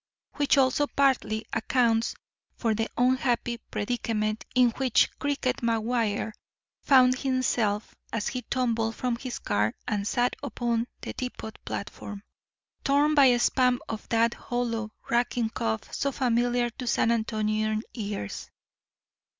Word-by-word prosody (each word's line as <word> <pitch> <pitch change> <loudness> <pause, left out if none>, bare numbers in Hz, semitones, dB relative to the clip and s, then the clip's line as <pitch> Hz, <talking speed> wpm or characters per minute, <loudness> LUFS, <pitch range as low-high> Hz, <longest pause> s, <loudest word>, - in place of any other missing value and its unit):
Which 285 -1 +3
also 270 +2 +3
partly 255 -6 +1
accounts 230 0 +2 0.4
for 225 -3 0
the 225 +1 -1
unhappy 245 -1 +1
predicament 215 -1 -2
in 250 -2 +5
which 255 0 +2
"Cricket" 280 -3 0
McGuire 225 -2 0 0.5
found 255 -2 +5
himself 240 -6 0 0.2
as 225 -2 -1
he 250 - -4
tumbled 230 -2 0
from 250 -2 -1
his 250 0 -5
car 105 +2 0
and 205 -1 -1
sat 245 +2 +1
upon 240 -4 -1
the - - -5
depot 250 -3 -5
platform, 200 0 -6 0.6
torn 290 +2 +3
by 285 -2 +7
a 245 -1 +5
spasm 250 0 +3
of 220 -1 -6
that 230 0 +3
hollow, 230 -3 -3 0.2
racking 235 -1 +1
cough 110 - -3
so 280 - 0
familiar 245 -1 +1
to 250 +2 -7
San 235 - +2
Antonian 215 -1 0
ears. 205 - -5
235 Hz, 125 wpm, -27 LUFS, 220-255 Hz, 0.6 s, by